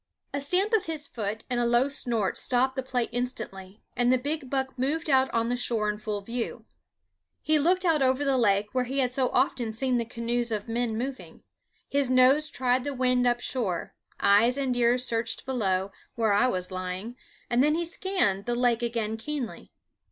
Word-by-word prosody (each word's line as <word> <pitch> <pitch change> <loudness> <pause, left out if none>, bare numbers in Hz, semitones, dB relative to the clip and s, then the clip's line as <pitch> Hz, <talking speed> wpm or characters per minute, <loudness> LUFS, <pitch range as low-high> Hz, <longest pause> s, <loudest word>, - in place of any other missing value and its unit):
A 280 - -1
stamp 370 +10 +1
of 435 -6 +2
his 310 -2 -2
foot 220 -4 -4
and 245 -1 -1
a 240 - +1
low 240 +3 +3
snort 235 -7 0
stopped 260 +1 +2
the 265 - -1
play 255 -1 -1
instantly, 225 -5 -5
and 245 0 +2
the 255 - +4
big 285 +1 -3
buck 265 0 -1
moved 300 +4 0
out 265 0 +4
on 230 0 0
the 245 - 0
shore 225 -3 0
in 210 - -8
full 210 -1 -3
view. 230 +3 -4 0.8
He 310 0 +3
looked 365 +5 +2
out 320 -4 +3
over 265 +2 +2
the 275 -1 +2
lake, 205 -2 +2
where 255 -1 0
he 265 +3 -4
had 250 -2 +1
so 255 -1 +1
often 245 -3 0
seen 250 +1 0
the 235 - -2
canoes 235 +1 -2
of 210 0 -3
men 230 -1 -1
moving; 260 +3 -6 0.4
his 280 -2 +1
nose 260 +4 +4
tried 250 0 0
the 285 0 -4
wind 250 -1 +2
up 240 0 +1
shore; 210 -11 -2 0.3
eyes 210 +6 +4
and 265 -3 -1
ears 245 +1 +2
searched 230 -1 -1
below, 195 -7 0 0.2
where 225 -3 +2
I 205 +5 +4
was 185 -5 -2
lying; 185 +5 -5 0.4
then 275 +6 +3
he 340 +1 -1
scanned 335 - 0
the 240 - 0
lake 240 -1 +2
again 230 -2 -2
keenly. 265 0 -5
245 Hz, 195 wpm, -27 LUFS, 225-265 Hz, 0.8 s, the